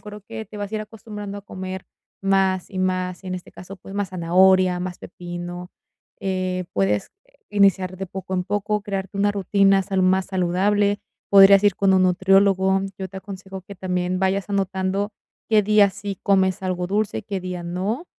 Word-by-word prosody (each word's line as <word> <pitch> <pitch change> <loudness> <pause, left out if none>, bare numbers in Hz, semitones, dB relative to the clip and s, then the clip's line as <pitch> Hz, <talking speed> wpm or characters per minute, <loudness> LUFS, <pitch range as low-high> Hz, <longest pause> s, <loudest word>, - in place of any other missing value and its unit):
creo 210 0 -10
que 220 +2 -7
te 215 - -12
vas 205 +1 -5
a - - -2
ir 215 - -1
acostumbrando 210 -1 -8
a 200 - -11
comer 185 -1 -7 0.4
más 190 -1 +1
y 190 - -5
más, 185 0 -1
en 185 -1 -4
este 180 - -12
caso, 185 +2 -10
pues 195 +1 -11
más 200 -2 -1
zanahoria, 185 +1 +3
más 180 -1 -5
pepino, 175 0 -7 0.5
eh, 185 -1 -2
puedes 100 +1 0 0.4
iniciar 190 -2 +3
de 195 +1 -5
poco 190 +1 -6
en 180 - 0
poco, 205 +2 -1
crearte 195 -1 -4
una 205 +1 +2
rutina 195 0 +3
salud 190 0 -1
más 190 0 +3
saludable, 200 +3 +1 0.3
podrías 195 0 +8
ir 200 -2 +4
con 195 -1 +3
un 185 0 +4
nutriólogo, 190 +1 +3 0.2
yo 190 -1 -5
te 190 - -11
aconsejo 190 -1 -9
que 200 +1 -11
también 180 0 -2
vayas 190 +1 0
anotando 195 +1 -1 0.4
qué 215 -2 +4
día 205 -1 +4
sí 195 0 -6
comes 190 -1 +2
algo 180 -1 -2
dulce 205 - -1
y - - -6
qué 195 -2 -4
día 180 -1 -5
no, 200 - -3
190 Hz, 180 wpm, -22 LUFS, 185-200 Hz, 0.5 s, podrías